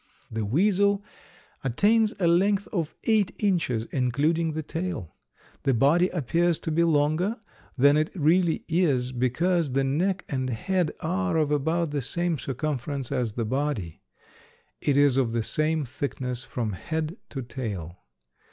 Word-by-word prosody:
The 110 -1 -2
weasel 200 - +2 0.6
attains 210 - +3
a 180 - +1
length 195 +4 +3
of 170 -5 -2
eight 215 -4 +2
inches, 145 - 0
including 150 +6 +1
the 155 0 -3
tail. 165 - -4 0.5
The 135 - +2
body 155 +9 +4
appears 170 +1 +1
to 160 - -3
be 165 +2 +3
longer 165 +7 +1 0.4
than 140 +3 +5
it 155 +1 +1
really 170 +1 +2
is 145 -8 +1
because 140 +5 +1
the 135 +1 +2
neck 180 +8 0
and 130 -3 -2
head 180 - 0
are 185 +1 0
of 150 -2 +1
about 160 +3 0
the 145 -1 -1
same 170 +4 -1
circumference 135 -1 -3
as 120 -4 -1
the 115 0 -2
body. 125 - -2 0.8
It 140 -1 +2
is 140 -2 +4
of 120 -4 +1
the 115 -1 0
same 155 +4 0
thickness 125 -1 -4
from 115 -4 -3
head 160 - -3
to 135 -3 -5
tail. 100 - -6
150 Hz, 145 wpm, -26 LUFS, 130-175 Hz, 0.8 s, than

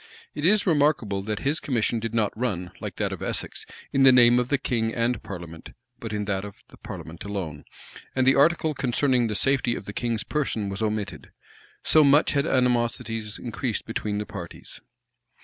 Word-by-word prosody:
[] - - -23
It 150 +2 0
is 210 +2 +4
remarkable 145 - +2
that 105 -1 -3
his 145 +4 +1
commission 120 -3 0
did 115 0 -4
not 110 -3 +1
run, 95 -7 -2
like - - -6
that - - -1
of - - -8
Essex, - - -3 0.3
in 135 - +3
the 135 -1 +8
name 120 -1 +6
of 125 0 -1
the 140 - +3
king 115 -4 -1
and 120 +1 0
parliament, 85 -4 -9 0.3
but 115 - -6
in 105 -1 -2
that 95 -1 -2
of 100 -1 -8
the - - -16
parliament 80 +1 -9
alone; 90 -8 -5 0.5
and 130 -1 +2
the 135 - +7
article 155 +2 +3
concerning 125 -2 +1
the 105 - -3
safety 130 -1 +1
of - - -7
the 105 - -7
king's 115 -2 -2
person 115 -9 -2
was 100 +2 -5
omitted: 105 -2 -3 0.5
so 155 - +6
much 145 +2 +5
had 140 +2 +1
animosities 120 -4 0
increased 120 -1 -3
between 105 -2 -3
the 105 - -3
parties. - - -9
115 Hz, 190 wpm, -25 LUFS, 105-135 Hz, 0.5 s, the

